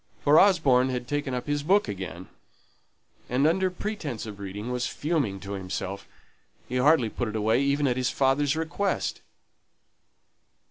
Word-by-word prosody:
For 150 Hz, +2 st, +6 dB
Osborne 140 Hz, -10 st, +4 dB
had 125 Hz, -1 st, -3 dB
taken 145 Hz, -2 st, -2 dB
up 125 Hz, -, -4 dB
his 145 Hz, 0 st, -1 dB
book 190 Hz, +5 st, +3 dB
again, 95 Hz, -3 st, -6 dB, 1.0 s
and 130 Hz, +4 st, +2 dB
under 185 Hz, +4 st, +2 dB
pretence 180 Hz, -, -5 dB
of 105 Hz, -2 st, -8 dB
reading, 100 Hz, +4 st, -5 dB
was 125 Hz, 0 st, -1 dB
fuming 140 Hz, -, -1 dB
to 100 Hz, -, -7 dB
himself. 95 Hz, 0 st, -5 dB, 0.6 s
He 125 Hz, -, -2 dB
hardly 130 Hz, -1 st, +4 dB
put 120 Hz, +2 st, -3 dB
it 110 Hz, -, -5 dB
away 110 Hz, +3 st, +2 dB
even 140 Hz, +1 st, +1 dB
at 125 Hz, -2 st, +1 dB
his 130 Hz, 0 st, +1 dB
father's 140 Hz, +2 st, +2 dB
request. 165 Hz, +5 st, -2 dB
130 Hz, 150 wpm, -26 LUFS, 110-150 Hz, 1.0 s, For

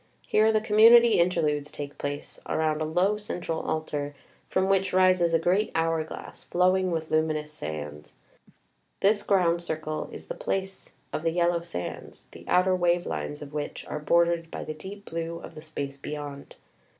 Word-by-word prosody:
Here 215 Hz, +1 st, +4 dB
the 215 Hz, -1 st, +2 dB
com 210 Hz, -1 st, -1 dB
munity 235 Hz, +1 st, +8 dB
Interludes 155 Hz, -4 st, +1 dB
take 145 Hz, -1 st, -7 dB
place 145 Hz, 0 st, -5 dB
around 155 Hz, -1 st, 0 dB
a -, -, +1 dB
low 180 Hz, +6 st, +2 dB
central 175 Hz, -5 st, -4 dB
Altar, 145 Hz, -2 st, -3 dB, 0.3 s
from 190 Hz, 0 st, +1 dB
which 195 Hz, 0 st, +2 dB
rises 185 Hz, -2 st, +4 dB
a 165 Hz, -, +4 dB
great 185 Hz, +6 st, +1 dB
hour 165 Hz, -1 st, +1 dB
glass, 155 Hz, -, -9 dB
flowing 185 Hz, +1 st, +2 dB
with 160 Hz, -2 st, -3 dB
luminous 155 Hz, -1 st, 0 dB
sands. 75 Hz, -, -7 dB, 0.9 s
This 205 Hz, +1 st, +4 dB
ground 175 Hz, -4 st, +2 dB
circle 155 Hz, -2 st, -4 dB
is -, -, -9 dB
the -, -, -5 dB
place 195 Hz, -, -4 dB, 0.2 s
of -, -, -1 dB
the 165 Hz, -, +1 dB
Yellow 170 Hz, 0 st, +1 dB
Sands, 90 Hz, -, -7 dB
the -, -, -13 dB
outer 185 Hz, +1 st, +4 dB
wave 175 Hz, -1 st, +2 dB
lines 150 Hz, 0 st, -4 dB
of 145 Hz, 0 st, -11 dB
which 150 Hz, -1 st, -4 dB
are 150 Hz, -, -4 dB
bordered 170 Hz, +1 st, +2 dB
by -, -, -5 dB
the 155 Hz, -, -5 dB
deep 195 Hz, +6 st, -10 dB
blue 165 Hz, 0 st, -4 dB
of -, -, -10 dB
the 155 Hz, -, -10 dB
space 140 Hz, -3 st, -5 dB
beyond. 145 Hz, 0 st, -7 dB
165 Hz, 175 wpm, -27 LUFS, 150-185 Hz, 0.9 s, munity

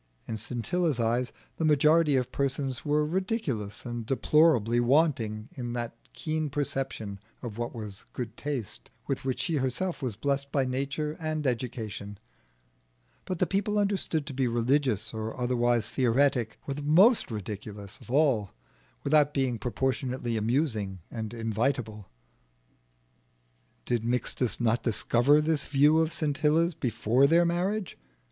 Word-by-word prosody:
In 110 Hz, -, -4 dB
Scintilla's 125 Hz, -, -1 dB
eyes 120 Hz, +2 st, +1 dB, 0.3 s
the -, -, -2 dB
majority 150 Hz, 0 st, +4 dB
of 125 Hz, -1 st, 0 dB
persons 135 Hz, -1 st, -1 dB
were 150 Hz, 0 st, +2 dB
ridiculous 160 Hz, -, -2 dB
and 120 Hz, -1 st, -4 dB
deplorably 130 Hz, -2 st, +3 dB
wanting 120 Hz, -5 st, +2 dB
in 120 Hz, -2 st, -5 dB
that 120 Hz, -1 st, -4 dB, 0.2 s
keen 155 Hz, -1 st, -2 dB
perception 135 Hz, -7 st, -3 dB, 0.2 s
of 115 Hz, -2 st, -6 dB
what 120 Hz, +1 st, -3 dB
was 105 Hz, -3 st, -7 dB
good 120 Hz, -2 st, -5 dB
taste, 120 Hz, -, -4 dB, 0.2 s
with 135 Hz, -, -2 dB
which 130 Hz, -1 st, -1 dB
she 165 Hz, -3 st, 0 dB
herself 140 Hz, +7 st, -1 dB
was 125 Hz, -6 st, -2 dB
blest 140 Hz, +4 st, -1 dB
by 135 Hz, -2 st, +2 dB
nature 140 Hz, +4 st, -2 dB
and 155 Hz, -2 st, -2 dB
education; 115 Hz, -5 st, -3 dB, 1.1 s
but 185 Hz, -, -3 dB
the -, -, +2 dB
people 205 Hz, +2 st, 0 dB
understood 195 Hz, -7 st, 0 dB
to 140 Hz, -, -7 dB
be 130 Hz, -1 st, +1 dB
religious 120 Hz, -2 st, +1 dB
or 110 Hz, +2 st, -5 dB
otherwise 120 Hz, -2 st, +1 dB
theoretic, 125 Hz, -2 st, +2 dB
were 140 Hz, -, -2 dB
the 145 Hz, -, -6 dB
most 185 Hz, -, +5 dB
ridiculous 105 Hz, -2 st, -7 dB
of -, -, -15 dB
all, 130 Hz, -7 st, +2 dB, 0.5 s
without 150 Hz, 0 st, +3 dB
being 130 Hz, -4 st, 0 dB
proportionately 125 Hz, -1 st, -1 dB
amusing 110 Hz, -4 st, 0 dB
and 110 Hz, -2 st, -4 dB
invitable. 115 Hz, -2 st, -2 dB, 1.8 s
Did 120 Hz, -2 st, 0 dB
Mixtus 125 Hz, 0 st, 0 dB
not 120 Hz, 0 st, +2 dB
discover 120 Hz, +5 st, +3 dB
this 155 Hz, -2 st, 0 dB
view 145 Hz, +3 st, +4 dB
of 160 Hz, 0 st, +1 dB
Scintilla's 155 Hz, +3 st, +1 dB
before 125 Hz, 0 st, +2 dB
their 170 Hz, +3 st, +5 dB
marriage? 185 Hz, +4 st, -1 dB
130 Hz, 135 wpm, -28 LUFS, 115-150 Hz, 1.8 s, most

